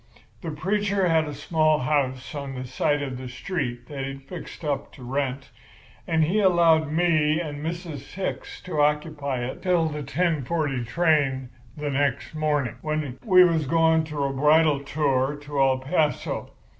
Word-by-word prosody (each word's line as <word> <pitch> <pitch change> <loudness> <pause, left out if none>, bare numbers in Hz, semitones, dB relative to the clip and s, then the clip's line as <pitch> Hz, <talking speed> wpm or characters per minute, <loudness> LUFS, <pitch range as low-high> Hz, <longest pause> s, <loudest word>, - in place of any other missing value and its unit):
"The 170 - -4
preacher 195 +4 0
had 160 -1 +3
a 150 - -5
small 155 +1 +2
house 130 -1 -1
on 140 -2 -5
the 130 0 -5
side 145 +3 0
of 130 -3 -5
the 130 -1 -7
street 125 -3 -4
that 140 -2 -6
he'd 135 0 -6
fixed 165 +2 -9
up 145 -2 -2
to 130 - -12
rent; 135 +1 -3 0.6
and 160 -1 +2
he 180 +8 +1
allowed 170 -5 +4
me 155 -2 +2
and 150 -3 -5
Mrs. 165 -4 -6
Hicks 190 0 -4
to 160 -5 -1
occupy 145 -4 0
it 130 - -6
till 180 -3 +2
the 150 -1 -5
ten 160 0 0
forty 145 -4 -1
train 135 -2 +1 0.3
the 150 -1 -2
next 140 0 0
morning, 150 -6 0
when 155 -4 -3
we 185 -5 +7
was 165 -5 +2
going 160 0 +3
on 140 -2 -1
a - - -6
bridal 150 +1 +4
tour 140 -1 0
to 145 -1 -2
El 135 -1 +4
Paso. 150 +3 -1
150 Hz, 170 wpm, -25 LUFS, 135-160 Hz, 0.6 s, we